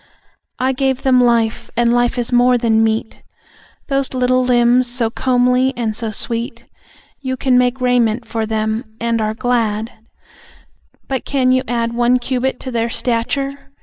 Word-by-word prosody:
I 260 +1 +1
gave 265 0 -1
them 255 -2 +4
life, 230 -2 +1
and 235 0 +3
life 245 +1 +1
is 245 0 -2
more 245 +1 +4
than 225 -2 +2
meat; 220 0 -2 0.7
Those 275 -1 -1
little 255 0 +2
limbs, 245 0 +3
so 240 -2 -1
comely 250 +1 +1
and 225 -3 -2
so 225 0 -3
sweet. 230 +2 -3 0.6
You 260 -1 -3
can 255 -1 +1
make 250 +1 +2
raiment 245 -2 +1
for 225 -1 -3
them, 220 0 -3
and 230 -1 0
are 215 0 -1
glad, 225 -2 -1 1.2
But 265 -2 -2
can 260 -2 +1
you 255 0 +3
add 235 -1 -1
One 240 +1 +3
cubit 255 +1 -2
to 260 - -6
their 230 -1 -1
stature? 275 +5 -2
245 Hz, 155 wpm, -17 LUFS, 230-255 Hz, 1.2 s, them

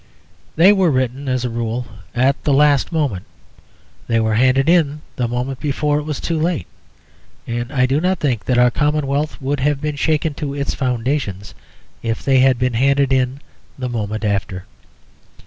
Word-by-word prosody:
They 180 +6 +6
were 190 -4 +3
written, 130 0 -1
as 130 -1 0
a - - -1
rule, 115 +1 -3 0.3
at 130 +3 +1
the 145 - +2
last 145 +1 +3
moment; 140 - -1 0.8
they 115 -1 +2
were 110 -1 +1
handed 130 +4 +3
in 155 -4 +2
the 125 - -1
moment 125 +2 -3
before 150 0 0
it 150 - -6
was 150 -3 -3
too 165 -2 -2
late, 165 - -1 0.8
and 120 +1 -4
I 130 -3 +2
do 135 +4 +1
not 185 0 0
think 125 -7 -1
that 125 - +1
our 125 0 +5
commonwealth 150 +1 -1
would 140 +1 -2
have 145 +1 +1
been 150 0 -3
shaken 155 +1 0
to 140 -1 -5
its 140 -1 -2
foundations 125 -5 -2 0.5
if 115 -1 -3
they 135 -1 +4
had 130 -1 +4
been 125 0 0
handed 135 +3 +2
in 130 +1 0 0.4
the 130 -2 -3
moment 110 -2 -3
after. 95 -2 -2
135 Hz, 175 wpm, -19 LUFS, 120-150 Hz, 0.8 s, They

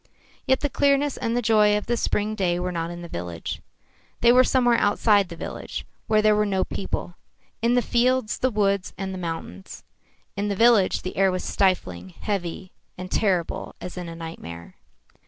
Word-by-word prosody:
Yet 265 0 +3
the 290 - +1
clearness 280 +1 +2
and 230 +1 -1
the 245 - 0
joy 210 -2 +4
of 210 - -4
the 240 - 0
spring 215 -2 0
day 180 -5 0
were 180 +1 -2
not 165 -1 -3
in 175 0 -7
the - - -7
village. 85 - -5 0.6
They 235 - +6
were 255 +1 +7
somewhere 245 -2 +3
outside 205 -2 +3
the 170 - -7
village, - - -6 0.2
where 215 -1 +3
there 215 0 +5
were 210 - +3
no 195 -2 0
people 180 -2 -4 0.5
in 235 +2 +3
the 245 - +3
fields, 245 0 +1
the 255 - +2
woods 200 -4 0
and 190 -1 -4
the 185 - -5
mountains. 165 - -6 0.5
In 200 +1 -1
the 200 - -1
village 225 -2 +4
the 185 - -6
air 195 0 +4
was 185 0 -3
stifling, 95 - 0
heavy 185 -2 -3 0.3
and 185 0 -7
terrible 185 -6 0
as 180 - -7
in 180 -2 -6
a 165 - -7
nightmare. 85 - -8
200 Hz, 190 wpm, -24 LUFS, 175-230 Hz, 0.6 s, were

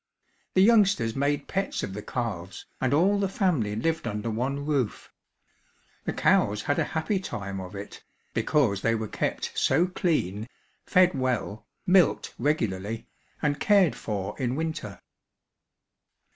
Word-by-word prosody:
The 185 - +6
youngsters 195 - +4
made 140 +1 0
pets 195 +1 -2
of 95 - -4
the 105 - -5
calves 100 -7 -4 0.2
and 130 -1 +1
all 190 +8 +3
the 195 -1 0
family 155 - 0
lived 160 +9 -1
under 105 +2 -2
one 135 +5 -2
roof. 140 -7 -1 0.9
The - - -1
cows 105 +1 +2
had 145 - 0
a - - +3
happy 190 +5 0
time 100 - -5
of 95 +1 -8
it, 100 +1 -8 0.3
because 110 -10 +2
they 115 +2 +2
were 110 -1 -3
kept - - -2
so 160 +7 +3
clean, 125 - -1 0.4
fed 180 -1 +5
well, 125 -5 -2 0.2
milked 180 -1 +3
regularly, 110 -6 -1 0.4
and 145 -1 +1
cared 200 -6 +4
for 100 -2 -4
in 125 -1 0
winter. 155 -10 -4
130 Hz, 140 wpm, -27 LUFS, 105-165 Hz, 0.9 s, The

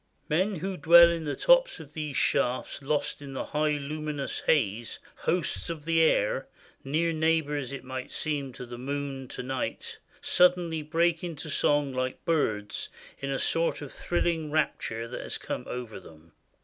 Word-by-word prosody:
Men 185 +7 +2
who 185 +3 -3
dwell 170 +1 +8
in 165 -2 -3
the 145 - -2
tops - - +4
of 150 -2 -11
those 150 -4 -3
shafts 125 +3 +1
lost 145 +1 -1
in 140 -1 -8
the 130 - -3
high 150 0 +1
luminous 150 0 -3
haze, 115 -6 +1 0.2
hosts 175 0 -1
of 155 -3 -5
the 165 0 +3
air, - - +2 0.4
near 160 +4 +1
neighbors 155 -4 +1
it 135 -2 -6
might 130 0 -5
seem 145 -4 -2
of 125 - -7
the 120 0 -7
moon 135 0 -4
to - - -6
night, 130 0 -4 0.2
suddenly 175 -3 +3
break 165 +2 +1
into 160 -3 -5
song 145 -1 +2
like 130 0 -3
birds, 110 -11 0 0.3
in 140 - -4
a 135 - 0
sort 165 0 0
of 140 - -9
thrilling 170 -3 -1
rapture 115 -6 -1
that 125 - -6
has - - -5
come - - -5
over 120 -5 -5
them. 80 -2 -16
150 Hz, 165 wpm, -28 LUFS, 130-165 Hz, 0.4 s, dwell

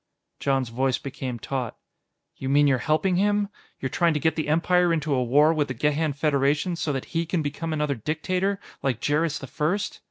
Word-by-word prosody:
Jon's 135 -3 0
voice 130 +2 +1
became 130 -2 -5
taut. 125 0 -4 0.6
"You 130 - -4
mean 145 +1 +5
you're 135 -3 +3
helping 175 +6 +1
him? 205 +1 +2 0.3
You're 130 - -2
trying 170 +3 +2
to - - +1
get 160 +2 +1
the 155 - -2
Empire 175 +3 +3
into 155 -3 0
a 130 -2 +2
war 145 +6 +4
with 150 -2 0
the 125 - -4
Gehan 150 +4 +1
Federation 145 +3 +1
so 160 -2 -1
that 135 -2 -3
he 165 0 +1
can 170 -1 -1
become 155 +3 -3
another 150 -2 0
dictator, 180 - -1 0.2
like 130 -4 0
Jerris 150 +3 +1
the - - -7
First?" 165 +10 -2
150 Hz, 195 wpm, -25 LUFS, 135-165 Hz, 0.6 s, mean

